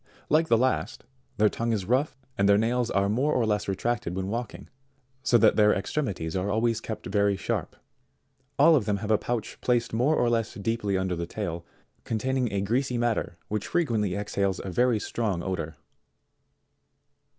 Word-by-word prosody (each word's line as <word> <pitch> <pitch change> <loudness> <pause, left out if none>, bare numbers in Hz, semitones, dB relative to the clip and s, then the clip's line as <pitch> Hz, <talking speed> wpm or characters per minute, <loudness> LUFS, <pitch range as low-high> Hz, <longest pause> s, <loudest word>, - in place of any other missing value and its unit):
Like 160 +2 +3
the 115 - +4
last, 130 +2 0 0.3
their 105 - +5
tongue 115 +2 -1
is 105 -4 -1
rough, 130 +6 +1 0.2
and 100 0 +2
their 100 - +6
nails 120 +2 +1
are 100 0 +1
more 130 +9 +1
or 120 - +2
less 105 -1 0
retracted 100 -1 -2
when 95 0 -3
walking, 120 +2 -5 0.5
so 120 - +4
that 110 - +4
their 105 -1 +5
ex 95 - -4
tremities 95 - -2
are 95 +2 -1
always 115 +1 +1
kept 110 - -6
very 100 0 +1
sharp. - - -3 0.8
All 160 +3 +7
of 125 -8 +1
them 105 -2 0
have 105 +2 -3
a 110 - +4
pouch 115 -3 -4
placed 120 -2 +1
more 130 +7 +2
or 120 - +2
less 115 -2 0
deeply 105 -2 -1
under 95 -1 -1
the 85 0 -4
tail, 85 -4 -5 0.4
containing 125 +2 -1
a 100 - -1
greasy 125 +5 0
matter 120 -7 -1
which 105 -1 -3
frequently 110 - 0
exhales 100 -2 -1
a 95 - -5
very 120 +3 +2
strong 100 -5 -2
odour. 85 -4 -3
110 Hz, 180 wpm, -27 LUFS, 100-120 Hz, 0.8 s, All